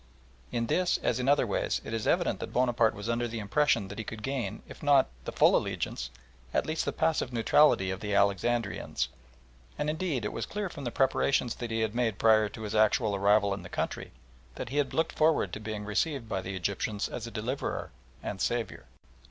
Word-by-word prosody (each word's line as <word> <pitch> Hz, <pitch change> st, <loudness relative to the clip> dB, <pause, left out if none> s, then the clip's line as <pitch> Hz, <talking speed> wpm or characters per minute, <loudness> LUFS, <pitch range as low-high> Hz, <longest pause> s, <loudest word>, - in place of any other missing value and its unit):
In 115 Hz, -1 st, 0 dB
this, 180 Hz, +9 st, +2 dB
as 120 Hz, -, +1 dB
in 125 Hz, +2 st, +1 dB
other 145 Hz, -, +4 dB
ways, -, -, 0 dB
it -, -, -6 dB
is 110 Hz, -1 st, -2 dB
evident -, -, +2 dB
that -, -, -5 dB
Bonaparte 120 Hz, -3 st, +2 dB
was 100 Hz, +2 st, -6 dB
under 120 Hz, +1 st, 0 dB
the 115 Hz, 0 st, -5 dB
impression 110 Hz, 0 st, +2 dB
that 105 Hz, +3 st, -8 dB
he -, -, -2 dB
could 110 Hz, 0 st, -8 dB
gain, 135 Hz, -2 st, -3 dB
if -, -, -12 dB
not 145 Hz, -3 st, +4 dB, 0.2 s
the -, -, -3 dB
full -, -, +5 dB
allegiance, -, -, -2 dB, 0.5 s
at -, -, +2 dB
least 155 Hz, 0 st, -1 dB
the -, -, 0 dB
passive 160 Hz, -5 st, 0 dB
neutrality 115 Hz, -4 st, +4 dB
of 95 Hz, -, -4 dB
the 105 Hz, -1 st, -2 dB
Alexandrians, 100 Hz, -, +1 dB, 0.7 s
and, 150 Hz, -, 0 dB
indeed, 155 Hz, -, -2 dB
it -, -, -3 dB
was -, -, -3 dB
clear 205 Hz, -2 st, -3 dB
from 145 Hz, -5 st, -8 dB
the 120 Hz, -, -2 dB
preparations 135 Hz, -2 st, +2 dB
that 120 Hz, -, -6 dB
he 115 Hz, 0 st, -1 dB
had 110 Hz, -1 st, 0 dB
made 120 Hz, -4 st, 0 dB
prior 110 Hz, -1 st, +4 dB
to 110 Hz, -, -9 dB
his 105 Hz, 0 st, -4 dB
actual 110 Hz, 0 st, +3 dB
arrival 100 Hz, 0 st, +3 dB
in 100 Hz, -, -5 dB
the 85 Hz, -, -10 dB
country, -, -, -3 dB, 0.4 s
that -, -, -5 dB
he 140 Hz, -, -3 dB
had 145 Hz, -2 st, 0 dB
looked 160 Hz, 0 st, +1 dB
forward 155 Hz, -, +2 dB
to -, -, -4 dB
being 110 Hz, -1 st, -5 dB
received 125 Hz, +4 st, -1 dB
by 95 Hz, -3 st, -2 dB
the 95 Hz, +1 st, -5 dB
Egyptians 100 Hz, +3 st, -2 dB
as 120 Hz, -1 st, -6 dB
a -, -, -5 dB
deliverer 120 Hz, +5 st, -3 dB, 0.3 s
and 95 Hz, -, -4 dB
saviour. 120 Hz, -3 st, -2 dB
115 Hz, 210 wpm, -29 LUFS, 105-135 Hz, 0.7 s, full